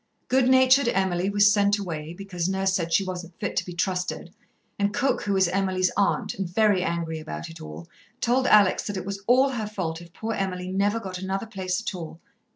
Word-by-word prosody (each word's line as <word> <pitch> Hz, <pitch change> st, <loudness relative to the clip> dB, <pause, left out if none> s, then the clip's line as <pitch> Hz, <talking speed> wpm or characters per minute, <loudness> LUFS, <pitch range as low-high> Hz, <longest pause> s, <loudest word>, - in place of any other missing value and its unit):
Good 260 Hz, 0 st, +3 dB
natured 260 Hz, 0 st, +5 dB
Emily 190 Hz, -3 st, +1 dB
was 205 Hz, 0 st, +5 dB
sent 205 Hz, 0 st, +3 dB
away, 165 Hz, -4 st, -5 dB
because 185 Hz, -3 st, -3 dB
Nurse 190 Hz, 0 st, 0 dB
said 170 Hz, -3 st, -1 dB
she 195 Hz, -, +3 dB
wasn't 180 Hz, -2 st, -7 dB
fit -, -, -3 dB
to -, -, +1 dB
be 180 Hz, -, -6 dB
trusted, 180 Hz, 0 st, -2 dB, 0.5 s
and 200 Hz, 0 st, +1 dB
Cook, 270 Hz, +2 st, +1 dB
who 200 Hz, -, -1 dB
was 190 Hz, -2 st, +3 dB
Emily's 185 Hz, 0 st, +1 dB
aunt, 200 Hz, -, +1 dB
and 190 Hz, -3 st, -4 dB
very 205 Hz, 0 st, +3 dB
angry 165 Hz, -2 st, -2 dB
about 155 Hz, +2 st, -7 dB
it 165 Hz, -, -12 dB
all, 75 Hz, +2 st, -9 dB, 0.3 s
told 255 Hz, +1 st, +2 dB
Alex 205 Hz, -3 st, +5 dB
that 205 Hz, -2 st, -3 dB
it 185 Hz, -, -5 dB
was 200 Hz, 0 st, -5 dB
all 260 Hz, +3 st, +5 dB
her 230 Hz, -5 st, -3 dB
fault 175 Hz, -6 st, -4 dB
if 170 Hz, -1 st, -14 dB
poor 220 Hz, +6 st, -4 dB
Emily 185 Hz, -2 st, -3 dB
never 205 Hz, +3 st, +1 dB
got 185 Hz, -4 st, -6 dB
another 190 Hz, +3 st, -3 dB
place 190 Hz, -3 st, -3 dB
at 225 Hz, -, -4 dB
all. 165 Hz, -2 st, -8 dB
190 Hz, 210 wpm, -25 LUFS, 175-205 Hz, 0.5 s, natured